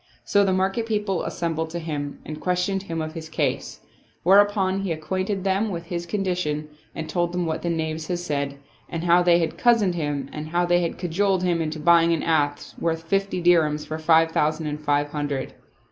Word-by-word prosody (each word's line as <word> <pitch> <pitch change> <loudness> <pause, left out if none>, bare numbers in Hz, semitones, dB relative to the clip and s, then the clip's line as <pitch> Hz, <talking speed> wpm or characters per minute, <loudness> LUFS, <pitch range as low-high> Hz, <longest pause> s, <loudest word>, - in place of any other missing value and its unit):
So 200 0 +3
the 195 - +2
market 190 +5 0
people 210 -4 -1
assembled 160 -1 -2
to 170 - -5
him 150 -4 -4
and 155 0 -7
ques 180 0 +1
tioned 195 0 -1
him 165 -4 -4
of 155 0 -6
his 160 -1 -7
case; 160 - -2 0.4
whereupon 195 0 +4
he 195 -3 -2
acquainted 185 +5 -2
them 195 +3 +1
with 170 -3 -5
his 170 0 -4
condition 175 -6 -2 0.3
and 160 - -4
told 175 0 -1
them 180 -1 -1
what 160 0 -2
the 170 - -2
knaves 160 -1 -2
had 175 - -1
said 140 -5 -3 0.3
and 165 0 -4
how 175 0 +5
they 175 -1 +5
had 165 -2 -2
cozened 230 -6 +4
him 145 -4 -2
and 150 0 -5
how 175 +2 +1
they 175 0 +3
had 170 - -2
cajoled 185 +2 0
him 175 -2 +1
into 155 0 -3
buying 170 +1 +5
an 165 - -1
ass 145 -3 0
worth 165 -1 -1
fifty 195 +1 -1
dirhams 155 -4 +3
for 155 0 -5
five 160 0 +4
thousand 155 +1 0
and 150 0 -4
five 145 0 +1
hundred. 145 -2 -3
170 Hz, 205 wpm, -24 LUFS, 155-185 Hz, 0.4 s, how